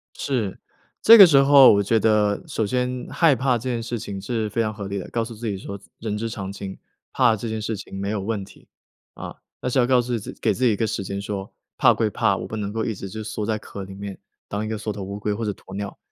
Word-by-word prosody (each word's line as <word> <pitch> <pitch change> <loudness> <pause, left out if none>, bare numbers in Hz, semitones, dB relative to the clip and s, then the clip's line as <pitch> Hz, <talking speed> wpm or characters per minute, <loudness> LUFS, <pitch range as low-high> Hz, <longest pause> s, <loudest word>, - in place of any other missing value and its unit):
是， 115 -9 -2 0.4
这 230 - +10
个 200 -4 +11
时 155 -5 +4
候 140 -1 +8
我 100 -1 +3
觉 110 +3 +2
得， 105 -1 +2
首 110 - -1
先 125 +2 -2
害 165 -5 +4
怕 125 0 +1
这 120 +3 -4
件 120 -2 -2
事 120 +1 -4
情 100 -2 -6
是 110 +2 -2
非 110 - -1
常 110 -1 0
合 105 -2 -7
理 100 0 -3
的。 95 - -7
告 115 -1 -1
诉 115 0 -8
自 115 +2 -7
己 100 - -2
说 100 +1 -7 0.2
人 110 -2 -3
之 115 +2 -3
常 100 -3 -5
情， 100 -1 -7 0.3
怕 120 -4 +4
这 115 +2 -5
件 110 0 -3
事 110 +1 -3
情 95 -1 -8
没 100 +1 -2
有 105 -1 -1
问 100 0 -3
题。 - - -18 0.5
啊， - - -8 0.3
但 125 - -2
是 130 - +1
要 120 - +4
告 125 -1 +4
诉 120 0 -2
自 105 - -8
给 110 - +2
自 130 - -1
己 120 - +5
一 - - -1
个 110 - 0
时 105 -1 -3
间 100 +1 -4
说， 100 -1 -5 0.3
怕 - - +6
归 110 - +1
怕， 105 -2 +1
我 - - -6
不 110 - -6
能 105 -1 -3
够 110 +1 -2
一 115 - -2
直 95 - -7
就 110 +3 -6
缩 105 0 -4
在 110 -1 0
壳 100 -1 -8
里 95 - -10
面， 100 0 -7 0.3
当 105 +1 -3
一 - - -4
个 110 -1 -3
缩 110 0 -3
头 100 -1 -7
乌 100 +1 -5
龟 105 0 -2
或 115 - -4
者 105 - -1
鸵 95 - -13
鸟， 100 0 -5
110 Hz, 300 characters per minute, -23 LUFS, 100-120 Hz, 0.5 s, 个